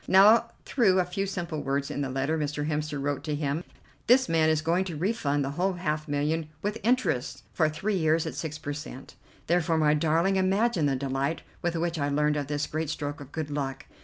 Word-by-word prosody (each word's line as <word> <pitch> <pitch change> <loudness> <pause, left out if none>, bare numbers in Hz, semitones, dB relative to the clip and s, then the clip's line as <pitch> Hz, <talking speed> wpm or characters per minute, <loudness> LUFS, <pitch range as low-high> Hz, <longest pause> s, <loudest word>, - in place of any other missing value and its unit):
Now, 215 +5 +6 0.2
through 200 -8 +3
a 180 - +2
few 195 +3 -2
simple 175 -5 -3
words 140 0 -1
in 145 - -3
the 135 - -2
letter 135 +4 0
Mr. 150 -1 -2
Hemster 150 -1 -2
wrote 145 0 -2
to 150 -2 -1
him, 145 +2 -2 0.4
this 255 +2 +5
man 160 -1 +3
is 155 -1 +1
going 170 +3 +2
to 170 -5 -5
refund 145 -7 0
the 135 - -3
whole 180 +6 0
half 155 -3 -2
million, 150 +2 -1
with 210 +2 -2
interest 135 - 0
for 155 -2 +2
three 195 +6 -1
years 160 -1 +2
at - - -4
six 155 -1 -4
per 145 -1 -4
cent. 145 -2 -8 0.3
Therefore, 170 -1 +2
my 150 -1 +4
darling, 165 +5 +2
imagine 190 -2 +2
the 135 - +1
delight 135 +3 -2 0.2
with 175 0 -1
which 170 0 -1
I 145 0 0
learned 150 +1 +2
of 145 -2 -2
this 145 0 -1
great 155 0 -3
stroke 145 0 -4
of 140 0 -11
good 155 -2 -4
luck. 135 -2 -3
155 Hz, 215 wpm, -27 LUFS, 145-175 Hz, 0.4 s, Now